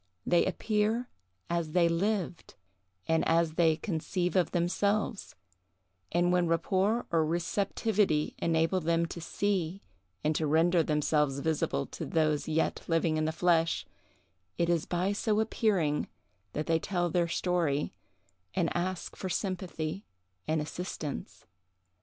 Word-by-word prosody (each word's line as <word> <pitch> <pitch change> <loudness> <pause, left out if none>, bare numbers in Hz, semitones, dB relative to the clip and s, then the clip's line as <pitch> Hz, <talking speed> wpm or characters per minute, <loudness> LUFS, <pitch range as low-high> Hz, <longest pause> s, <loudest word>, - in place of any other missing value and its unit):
They 175 - +3
appear 215 +5 0 0.4
as 170 -2 -2
they 175 -2 +5
lived, 180 0 -1 0.5
and 160 0 +2
as 165 0 +3
they 165 -1 +4
conceive 180 0 -2
of 180 -3 +3
themselves; 200 +5 0 0.8
and 175 +1 +2
when 180 -1 +3
rapport 190 +7 +1
or 165 -2 +3
receptivity 180 +1 0
enable 165 +3 +2
them 170 0 +1
to 170 +1 -7
see, 190 0 -1 0.4
and 155 +1 +1
to 155 - 0
render 165 +3 +4
themselves 150 -2 +1
visible 145 - 0
to - - -7
those 155 -2 +1
yet 160 +1 0
living 165 -1 +2
in 155 - +1
the 160 - +1
flesh, 165 0 +2 0.7
it 170 - +1
is 170 -2 +1
by 180 +3 0
so 210 +1 +1
appearing 200 -9 +1 0.5
that 150 - -2
they 165 +1 +2
tell 175 -2 -1
their 175 0 +2
story, 165 -4 0 0.6
and 175 -3 0
ask 180 0 -2
for 190 - -4
sympathy 185 -2 -3 0.4
and 155 0 +1
assistance. 150 - -6
170 Hz, 130 wpm, -30 LUFS, 160-185 Hz, 0.8 s, they